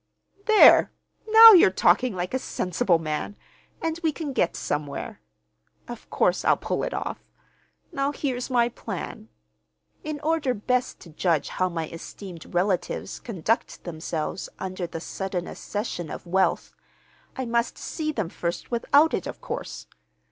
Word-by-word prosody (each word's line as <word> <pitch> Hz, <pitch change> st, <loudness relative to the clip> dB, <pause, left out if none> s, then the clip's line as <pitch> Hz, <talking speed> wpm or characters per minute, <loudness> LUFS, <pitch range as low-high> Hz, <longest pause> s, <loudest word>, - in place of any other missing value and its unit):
"There! 435 Hz, -1 st, +7 dB, 0.4 s
Now 450 Hz, +1 st, +11 dB
you're 360 Hz, -, +8 dB
talking 190 Hz, +5 st, +2 dB
like 180 Hz, +3 st, -4 dB
a 260 Hz, -, +1 dB
sensible 180 Hz, -5 st, 0 dB
man, 155 Hz, +5 st, -4 dB, 0.5 s
and 325 Hz, 0 st, -1 dB
we 320 Hz, -2 st, +1 dB
can 295 Hz, -2 st, -5 dB
get 175 Hz, -, +1 dB
somewhere. 150 Hz, +9 st, -4 dB, 0.7 s
Of -, -, -9 dB
course -, -, +1 dB
I'll -, -, +4 dB
pull -, -, -2 dB
it -, -, -2 dB
off! -, -, -4 dB, 0.7 s
Now 280 Hz, -3 st, -1 dB
here's 260 Hz, -4 st, -3 dB
my 240 Hz, -2 st, +3 dB
plan. 220 Hz, -1 st, -7 dB, 0.7 s
In 305 Hz, -1 st, -4 dB
order 300 Hz, -4 st, 0 dB
best 250 Hz, +4 st, -1 dB
to 170 Hz, -, -13 dB
judge 160 Hz, -2 st, 0 dB
how 185 Hz, 0 st, 0 dB
my 165 Hz, -2 st, -3 dB
esteemed 170 Hz, +1 st, -10 dB
relatives 180 Hz, +1 st, -1 dB
conduct 225 Hz, 0 st, -2 dB
themselves 165 Hz, +1 st, -4 dB
under 185 Hz, -1 st, -4 dB
the 165 Hz, -, -6 dB
sudden 185 Hz, +1 st, -4 dB
accession 205 Hz, -7 st, -5 dB
of -, -, -7 dB
wealth, 190 Hz, +2 st, 0 dB, 0.6 s
I 260 Hz, -, -2 dB
must 235 Hz, 0 st, -1 dB
see 310 Hz, -2 st, -3 dB
them 215 Hz, -, -3 dB
first 170 Hz, +4 st, -4 dB
without 285 Hz, +6 st, +3 dB
it, -, -, -2 dB
of -, -, -7 dB
course. -, -, -6 dB
205 Hz, 145 wpm, -25 LUFS, 175-270 Hz, 0.7 s, Now